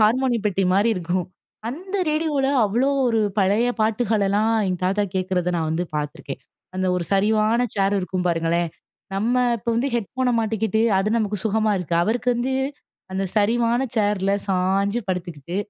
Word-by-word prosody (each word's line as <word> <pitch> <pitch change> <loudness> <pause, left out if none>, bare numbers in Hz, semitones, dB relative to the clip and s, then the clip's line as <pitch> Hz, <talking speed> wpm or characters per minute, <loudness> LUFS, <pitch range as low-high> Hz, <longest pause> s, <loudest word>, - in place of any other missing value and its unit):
Harmony 240 +2 +3
பெட்டி 195 -1 0
மாரி 205 +4 +3
இருக்கும். 180 0 -2 0.4
அந்த 370 +10 -5
ரேடியோவ்ல 305 -3 +1 0.2
அவ்ளோ 235 +7 +1 0.2
ஒரு 225 -2 +2 0.2
பழைய 205 +5 +3
பாட்டுகளெல்லாம் 215 -1 +1
எங்க 185 -1 -1
தாத்தா 195 +3 +1
கேட்க்கிறத 180 -1 0
நான் 160 -2 -1
வந்து 170 +3 -1
பார்த்துருக்கேன். 150 -1 -5 0.3
அந்த 185 0 -1
ஒரு 175 - -2
சரிவான 215 +3 +3
சேர் 200 0 +2
இருக்கும் 185 -1 -2
பாருங்களேன். 170 0 +1 0.5
நம்ம 225 +6 0 0.2
இப்ப 235 - -9
வந்து 245 +4 +1
ஹெட்ஃபோன 250 +3 -1
மாட்டிக்கிட்டு, 220 -1 0 0.2
அது 195 +2 +1
நமக்கு 210 -1 -1
சுகமா 220 0 +2
இருக்கு. 175 -2 -3
அவருக்கு 235 +4 -1
வந்து 260 +2 -1 0.6
அந்த 190 +1 -1
சரிவான 235 +3 +2
சேர்ல 205 -2 +1 0.2
சாய்ஞ்சு 195 +4 +1
படுத்துக்கிட்டு, 175 -3 -4
205 Hz, 145 wpm, -22 LUFS, 185-230 Hz, 0.6 s, Harmony